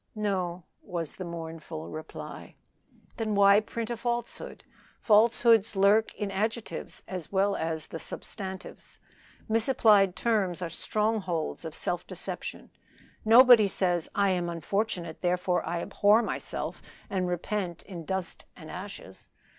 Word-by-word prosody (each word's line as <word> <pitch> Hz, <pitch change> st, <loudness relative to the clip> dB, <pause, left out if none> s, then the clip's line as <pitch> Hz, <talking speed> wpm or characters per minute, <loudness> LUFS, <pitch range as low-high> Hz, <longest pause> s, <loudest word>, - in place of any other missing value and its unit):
"No," 185 Hz, -4 st, -2 dB, 0.2 s
was 170 Hz, -5 st, -5 dB
the 185 Hz, -, -5 dB
mournful 160 Hz, -, -7 dB
reply. 155 Hz, -, -8 dB, 0.6 s
"Then 215 Hz, -2 st, -1 dB
why 200 Hz, 0 st, +7 dB
print 225 Hz, +2 st, -5 dB
a -, -, -1 dB
falsehood? 235 Hz, 0 st, -4 dB, 0.4 s
Falsehoods 225 Hz, 0 st, +4 dB
lurk 200 Hz, +3 st, +4 dB
in 205 Hz, -2 st, -3 dB
adjectives 220 Hz, +4 st, -3 dB
as 180 Hz, -4 st, -6 dB
well 200 Hz, +1 st, +2 dB
as 160 Hz, -1 st, -3 dB
substantives. 190 Hz, +2 st, -7 dB, 0.5 s
Misapplied 220 Hz, -4 st, +4 dB
terms 200 Hz, -7 st, 0 dB
are 165 Hz, -, -4 dB
strongholds 190 Hz, -5 st, -1 dB
of 160 Hz, -, -6 dB
self 175 Hz, 0 st, -2 dB
deception. -, -, -6 dB, 0.5 s
Nobody 235 Hz, -1 st, +8 dB
says, 180 Hz, -3 st, 0 dB
'I 200 Hz, -1 st, +3 dB
am 175 Hz, -2 st, 0 dB
unfortunate, 170 Hz, 0 st, -2 dB
therefore 180 Hz, 0 st, +1 dB
I 170 Hz, 0 st, -2 dB
abhor 210 Hz, +3 st, +4 dB
myself -, -, -4 dB, 0.3 s
and 190 Hz, -3 st, -1 dB
repent 180 Hz, 0 st, -3 dB
in 175 Hz, -4 st, -8 dB
dust 190 Hz, 0 st, -3 dB
and 160 Hz, -2 st, -10 dB
ashes.' 185 Hz, -, -9 dB
195 Hz, 125 wpm, -28 LUFS, 175-215 Hz, 0.6 s, Nobody